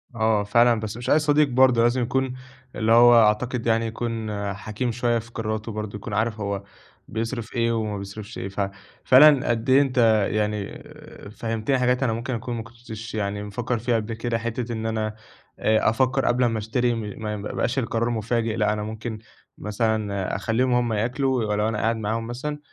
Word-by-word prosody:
آه 110 -2 +2
فعلًا، 115 +3 +4
بس 110 0 -5
مش 120 - -5
أي 155 - +5
صديق 150 -1 +3
برضه، 130 -2 +4
لازم 120 +2 +2
يكون 130 +2 0 0.4
اللي 110 +1 0
هو 120 +1 +8
أعتقد 115 +3 0
يعني 115 0 +2
يكون 115 -1 -3 0.2
حكيم 110 +4 -3
شوية 120 0 0
في 115 +1 -12
قراراتُه 110 0 -3
برضه، 105 -1 -5
يكون 105 +1 -7
عارف 110 +1 0
هو 100 -1 -3 0.4
بيصرِف 115 +1 -4
إيه 115 -1 +2
وما 110 -2 -2
بيصرِفش 100 +3 -8
إيه 95 - -4
ف 100 0 -2 0.3
فعلًا 140 0 +6
قد 115 +1 -1
إيه 135 +2 +6
أنت 115 -6 +3
يعني 105 -1 -1
آآ، - - -13
فهّمتِني 115 +4 -1
حاجات 125 +1 +2
أنا 120 -4 +1
ممكن 120 +3 -3
أكون 120 +1 -4
ما 115 - -4
كنتش 115 -2 -9
يعني 105 -1 -2
مفكّر 115 +3 -3
فيها 120 +1 0
قبل 115 0 -2
كده، 115 +1 -2
حتة 115 +1 -3
إن 110 -1 -4
أنا 110 -1 -2 0.4
آآ، 110 0 +3
أفكّر 130 +3 +1
قبل 125 +1 +2
ما 115 -2 0
أشتري 120 +3 0
م 115 - -3 0.2
ما 105 -1 -2
ما 100 - -6
يبقاش 130 +3 -1
القرار 115 -1 -1
مفاجئ، 115 0 -1
لأ 105 -1 +1
أنا 105 0 -3
ممكن 110 +1 -5 0.4
مثلًا 105 -2 -1
أخلّيهم 120 +6 0
هُم 120 -2 +1
ياكلوا 125 +3 0
ولو 105 0 0
أنا 110 - -2
قاعد 115 +2 +1
معاهم 110 +1 -2
مثلًا، 145 +5 -4
115 Hz, 190 wpm, -24 LUFS, 110-120 Hz, 0.4 s, هو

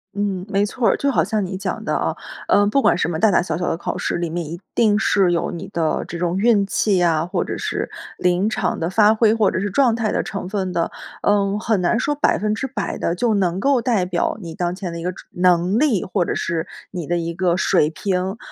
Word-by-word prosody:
嗯， 195 -2 -2
没 200 0 +1
错 230 +2 -1
儿， - - +3
就 280 0 +1
好 - - +2
像 215 -3 -1
你 185 +1 -5
讲 190 -1 -4
的 - - -1
啊， - - -1 0.3
呃， 205 - +4
不 275 +6 +2
管 175 - +3
什 175 - 0
么 160 - -2
大 220 - +5
大 175 - +3
小 180 - -2
小 175 - -2
的 165 - -1
考 - - -4
试 - - -2
里 170 -1 -2
面， 170 0 -3
一 170 +3 -7
定 210 -3 +3
是 195 -4 +3
有 170 - 0
你 170 - -6
的 165 -2 -1
这 170 - -6
种 175 +1 -1
运 210 -2 +3
气 200 0 +1
呀， 165 -2 +2
或 180 0 -1
者 - - -4
是 - - -3 0.3
临 180 +3 +1
场 - - -1
的 165 +1 -1
发 210 +2 +5
挥， 220 -1 +3
或 220 -3 +2
者 - - -1
是 205 +1 -1
状 240 +2 +3
态 225 -2 -1
的 - - 0
成 200 -3 -5
分 190 -3 -2
的， 170 - 0 0.3
嗯， 205 0 +2
很 220 -4 0
难 230 +7 +2
说 295 +2 0
100% 215 -3 -1
地 170 - -1
就 230 +3 +1
能 185 -2 0
够 270 +1 +2
代 225 -8 +1
表 180 +4 -1
你 165 -2 -7
当 175 0 -1
前 185 -2 -5
的 170 - -6
一 - - -6
个 180 - -1
知 - - -13
能 180 +2 +2
力， 255 - +2
或 185 -1 0
者 - - -2
是 165 -1 -2 0.3
你 175 -5 -5
的 175 +2 0
一 170 0 -3
个 175 0 +1
水 150 -4 +3
平。 190 +3 -2
190 Hz, 265 characters per minute, -21 LUFS, 175-215 Hz, 0.3 s, 大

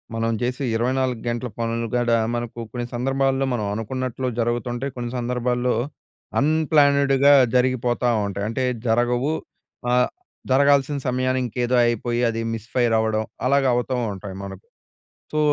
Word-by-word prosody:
మనం 115 0 0
చేసే 125 +3 -2
24 125 0 0
గంటల 120 +1 -2
పనులు 115 0 -1
కూడా 120 -1 +2 0.2
మనకు 120 0 -5
కొన్ని 120 -1 -3
సందర్భాల్లో 135 +1 +1
మనం 110 -4 -1
అనుకున్నట్లు 130 +3 -3
జరుగుతుంటాయి. 120 +3 -1
కొన్ని 120 -1 -4
సందర్భాల్లో 125 0 0 0.6
అన్‌ప్లాన్డ్‌గా 145 -2 +4 0.2
జరిగిపోతా 125 -1 +2 0.2
ఉంటాయి. 100 0 -3
అంటే 130 +3 -2 0.2
జరగవు, 120 +5 +2 0.6
ఆహ్, 125 0 +3 0.4
జరగాల్సిన 140 +1 +4
సమయానికి 130 0 0
ఇంకేదో 125 +1 -1
అయిపోయి 120 +1 0
అది 115 0 -2
మిస్ 115 0 -7
ఫైర్ 120 -3 +2
అవడం 110 0 0 0.2
అలాగా 140 0 +3
అవుతూ 125 +1 -1 0.2
ఉంటాయి 95 0 -8
మనకు. 95 -1 -9 0.7
సో, 155 - 0
125 Hz, 130 wpm, -23 LUFS, 115-130 Hz, 0.7 s, అన్‌ప్లాన్డ్‌గా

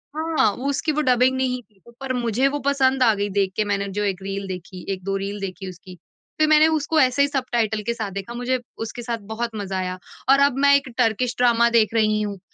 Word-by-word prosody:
हाँ, 315 -8 +1
वो 275 +3 -3
उसकी 305 +3 0
वो 305 +1 0
डबिंग 255 -1 +3
नहीं 255 -1 -1
थी। 200 -4 -33 0.2
पर 265 -1 -3
मुझे 245 +2 +1
वो 290 +1 -2
पसंद 265 -2 +3
आ 225 -3 +5
गई 205 0 -2
देख 190 -1 0
के, 215 - +1
मैंने 200 -1 -1
जो 210 - +1
एक 195 -2 -2
रील 195 0 -4
देखी, 180 0 -8
1-2 195 +1 -4
रील 200 +1 -4
देखी 190 0 -5
उसकी। 185 0 -12 0.4
फिर 310 - +4
मैंने 310 +1 +6
उसको 315 0 +1
ऐसे 255 +1 +3
ही 285 - +4
सबटाइटल 235 -6 -1
के 235 - +1
साथ 220 -4 -5
देखा। 200 +5 -6
मुझे 245 +1 -1 0.3
उसके 240 - -7
साथ 235 0 -3 0.2
बहुत 235 +1 -2
मज़ा 195 -2 -4
आया 185 0 -3 0.3
और 275 - +6
अब 280 -2 +3
मैं 280 0 +6
एक 280 -1 +1
टर्किश 240 +2 +1
ड्रामा 235 -1 +4
देख 220 0 +2
रही 215 -1 +2
हूँ। 205 -2 -4
235 Hz, 230 wpm, -22 LUFS, 200-265 Hz, 0.4 s, मैंने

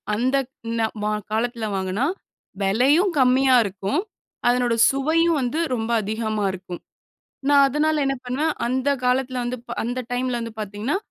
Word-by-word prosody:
அந்தக் 260 +3 0 0.3
ந - - +2 0.2
ம - - -1 0.3
காலத்தில 230 0 -1
வாங்குனா, 190 +6 -1 0.6
வெலையும் 275 - +3
கம்மியா 260 0 +4
இருக்கும். 200 - -2 0.5
அதனோட 245 -1 +2 0.2
சுவையும் 320 +4 +2
வந்து 255 +6 -1 0.2
ரொம்ப 225 0 -3
அதிகமா 215 0 -2
இருக்கும். 180 -2 -8 0.7
நா 290 - +5
அதனால 300 +2 +1
என்ன 275 0 +1
பண்ணுவேன்? 290 +6 -1
அந்த 260 +3 0 0.2
காலத்தில 255 0 +1
வந்து 245 +1 -2
ப் - - -5
அந்த 245 +2 -3
டைமில 250 0 -1
வந்து 230 -1 -6
பார்த்தீங்கன்னா, 210 - -2
250 Hz, 140 wpm, -23 LUFS, 220-275 Hz, 0.7 s, நா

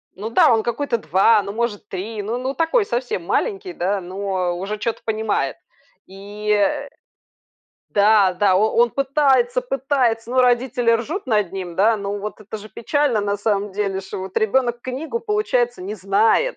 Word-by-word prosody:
Ну 210 +4 -5
да, 230 - +5
он 225 -1 +3
какой-то 240 +1 -1
2, 205 +3 +3
ну, 200 - -5
может, 215 -2 -3
3 205 +3 -5
ну 225 +4 -2
ну 260 +2 -3
такой 335 - +1
совсем 240 - -2
маленький, 390 - -1
да, 195 +3 -1
но 185 -1 -2
уже 200 +4 -4
чё-то 225 +2 -3
понимает. 215 -11 -1 0.5
И, 205 +2 -5
э. 280 +8 +1 1.0
Да, 205 -2 +4
да, 190 0 +3
о 215 +4 +3
он 235 0 +4
пытается, 280 - +2
пытается, 265 - 0
ну, 255 - +3
родители 245 -1 +2
ржут 290 - -2
над 210 -6 +1
ним, 185 -3 -6
да. 215 +5 +3
Но 200 0 -4
вот 210 +2 -6
это 215 +1 -7
же 215 +1 -11
печально, 275 -1 0
на 205 0 -1
самом 205 -1 -1
деле, 195 -1 -2
что 190 - -7
вот, 190 0 -8
ребёнок 240 +2 +1
книгу, 275 - -4
получается, 255 - 0
не 205 +3 -5
знает. 205 - +2
220 Hz, 170 wpm, -21 LUFS, 200-255 Hz, 1.0 s, да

